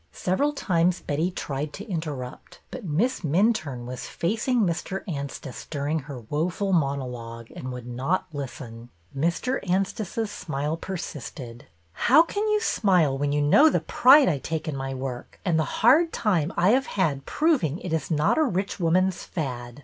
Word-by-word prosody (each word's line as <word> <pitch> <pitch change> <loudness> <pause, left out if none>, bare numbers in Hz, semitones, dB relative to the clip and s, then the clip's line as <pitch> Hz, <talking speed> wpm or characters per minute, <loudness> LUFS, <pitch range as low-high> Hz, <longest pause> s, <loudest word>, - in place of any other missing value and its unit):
Several 235 +12 0
times 180 - +1
Betty 155 +5 -1
tried 150 -4 -4
to 205 +3 -8
interrupt, 150 - -6
but 255 - -7
Miss 190 - 0
Minturne 155 - +1
was 125 0 -6
facing 225 +7 0
Mr. 185 +1 -1
Anstice 140 -5 -6
during 150 +1 -1
her 135 -3 -8
woeful 170 - -1
monologue, 125 -7 -2
and 130 - -6
would 125 -1 -7
not 130 +10 -1
listen. 120 -4 -7 0.3
Mr. 170 - 0
Anstice's 195 +3 -1
smile 150 -2 -3
persisted. 140 -8 -7
" 85 0 -38
How 285 +6 +8
can 410 +5 -2
you 425 0 +2
smile 180 - +2
when 145 +1 -1
you 145 0 +1
know 280 - +6
the - - +1
pride 270 +3 +6
I 145 - +1
take 160 +3 -4
in 155 - -2
my 135 0 -4
work 130 -2 -6
and 165 -4 +2
the 160 +7 -2
hard 325 +7 +6
time 180 -7 +1
I 180 - +4
have 260 +4 +3
had 150 -8 -1
proving 275 - +1
it 180 -3 -5
is 160 -4 -1
not 155 - +2
a - - +5
rich 195 - -1
woman's 185 +2 +2
fad 125 -5 -5
160 Hz, 165 wpm, -25 LUFS, 135-195 Hz, 0.3 s, How